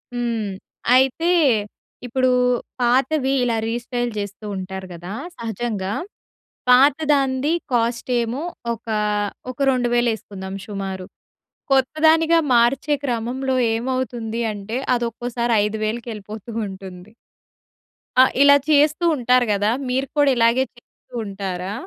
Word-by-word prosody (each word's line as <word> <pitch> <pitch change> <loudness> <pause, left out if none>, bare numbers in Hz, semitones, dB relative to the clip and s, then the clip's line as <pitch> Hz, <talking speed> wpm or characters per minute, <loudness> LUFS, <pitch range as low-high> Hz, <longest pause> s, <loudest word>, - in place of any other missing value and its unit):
హ్మ్. 230 -4 -1 0.5
అయితే, 270 +7 +3 0.7
ఇప్పుడూ 255 +1 +1 0.5
పాతవి 265 +3 +2
ఇలా 230 -2 +1
రీస్టైల్ 240 +1 -2
చేస్తూ 200 +1 -5
ఉంటారు 190 0 -6
గదా 175 +4 -8 0.2
సహజంగా. 220 -3 -3 0.8
పాత‌దాంది 275 +1 +3 0.2
కాస్టేమో 240 +2 0 0.3
ఒకా, 220 -1 -3 0.5
ఒక 255 - -10
2,000 240 -1 +2
యేసుకుందాం 195 -3 -7
సుమారు. 195 -3 -5 0.7
కొత్త 265 +2 +3
దానిగా 325 +1 +5 0.2
మార్చే 255 +5 +3
క్రమంలో 255 +2 -1 0.2
ఏమవుతుంది 235 -2 -2
అంటే, 210 +4 -5 0.2
అదొక్కోసారి 235 0 -2
5,000కి 220 +2 -3
యెళ్ళిపోతూ 210 +2 -9 0.2
ఉంటుంది. 190 +1 -10 1.1
ఆ! - - +10 0.2
ఇలా 285 0 +8
చేస్తూ 305 +3 +4
ఉంటారు 250 -1 +3
గదా! 205 +2 +1 0.2
మీరు 265 +2 0
కూడా 290 -1 +5
ఇలాగే 235 +3 +4
చేస్తూ 240 - -18
ఉంటారా? 195 -1 -4
240 Hz, 100 wpm, -21 LUFS, 210-260 Hz, 1.1 s, ఆ